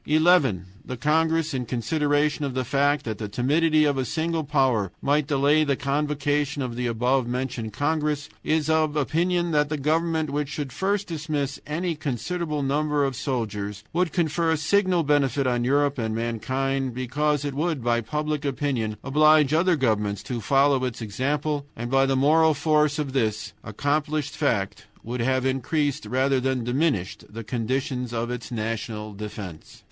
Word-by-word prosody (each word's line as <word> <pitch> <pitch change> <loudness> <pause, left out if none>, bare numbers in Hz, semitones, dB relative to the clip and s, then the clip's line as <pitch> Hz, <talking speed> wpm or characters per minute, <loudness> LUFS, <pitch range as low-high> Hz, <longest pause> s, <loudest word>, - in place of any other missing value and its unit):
"11. 150 - +3 0.2
The 130 - -6
congress, 160 +2 +1
in 125 -3 -3
consideration 145 +5 0
of 135 -3 -3
the 130 -1 -1
fact 145 +3 +1
that 110 -3 -4
the 105 -2 -4
timidity 155 +7 +2
of 140 -2 +1
a - - +1
single 160 +5 -1
power 130 - +1
might 145 0 +1
delay 145 +1 +3
the 140 -2 +1
convocation 145 +1 -1
of 120 -2 -4
the 125 0 -1
above 125 +2 +1
mentioned 120 -3 -3
congress, 150 +1 -1 0.2
is 155 -1 +1
of 155 -1 +2
opinion 170 +4 +1
that 150 -1 +2
the 155 - -1
government 160 +1 0
which 145 -1 -2
should 145 -4 -5
first 200 +4 0
dismiss 150 -4 -3
any 170 +3 -1
considerable 150 - -3
number 145 +1 +1
of 135 -1 -2
soldiers 105 -5 -3
would 180 0 +1
confer 165 -1 0
a 160 - +2
signal 185 +2 +2
benefit 140 -2 +2
on 120 -1 +1
Europe 140 +2 +2
and 110 -1 -1
mankind, 130 +3 -2
because 145 +3 0
it 145 - -2
would, 150 -2 -1
by 120 0 +2
public 150 +4 -2
opinion, 130 -6 -1
oblige 150 +1 +4
other 170 +2 +3
governments 105 -7 0
to 120 +1 -4
follow 135 +3 +3
its 125 -3 -3
example, 145 +6 -2
and 120 +2 -5
by 135 0 +4
the 135 - +1
moral 155 +3 +4
force 150 0 +2
of 145 -3 -3
this 110 -6 -1
accomplished 145 +5 -1
fact 105 -10 -1 0.2
would 120 +1 -4
have 130 +1 +1
increased 135 -1 -1
rather 130 +3 +2
than 130 -1 -1
diminished 125 - -1
the 115 +2 -7
conditions 125 +2 -2
of 120 0 -2
its 125 0 -6
national 110 -1 -4
defense. 100 -5 -8
140 Hz, 165 wpm, -25 LUFS, 125-150 Hz, 0.2 s, oblige